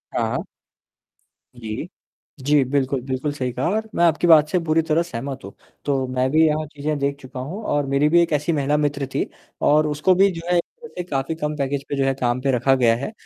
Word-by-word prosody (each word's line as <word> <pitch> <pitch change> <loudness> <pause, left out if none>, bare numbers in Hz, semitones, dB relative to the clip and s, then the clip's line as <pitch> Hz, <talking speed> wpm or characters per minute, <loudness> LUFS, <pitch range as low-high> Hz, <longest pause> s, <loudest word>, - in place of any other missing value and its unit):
हाँ। - - -1 1.1
जी। 115 +5 -6 0.6
जी 145 -1 +4
बिल्कुल, 135 0 0
बिल्कुल 130 +3 -3
सही 130 -3 -3
कहा 125 +2 -2
और 220 +3 -1
मैं 170 - +2
आपकी 165 +1 +2
बात 155 -3 +7
से 180 - +1
पूरी 160 0 +3
तरह 160 +1 +1
सहमत 135 -4 -6
हूँ। 100 - -9 0.3
तो 135 -2 0
मैं 130 0 0
भी 160 +2 +5
यहाँ 155 0 0
चीज़ें 150 +1 -2
देख 140 0 0
चुका 130 0 -9
हूँ 160 +12 -5
और 145 -7 0
मेरी 140 +2 +2
भी 170 +2 +5
एक 170 -2 0
ऐसी 150 +3 +1
महिला 145 0 +1
मित्र 145 -2 -1
थी - - 0 0.4
और 150 +1 +4
उसको 150 +5 +2
भी 195 +2 +5
जो 165 -2 -7
है 175 - +4
जैसे 465 - -7
काफ़ी 140 -2 -2
कम 150 -1 -3
पैकेज 140 0 -2
पे - - -1
जो 135 - +2
है 135 - +2
काम 120 0 0
पे 135 +1 +1
रखा 135 +3 +3
गया 120 -3 +3
है 135 - -5
145 Hz, 220 wpm, -22 LUFS, 135-160 Hz, 1.1 s, बात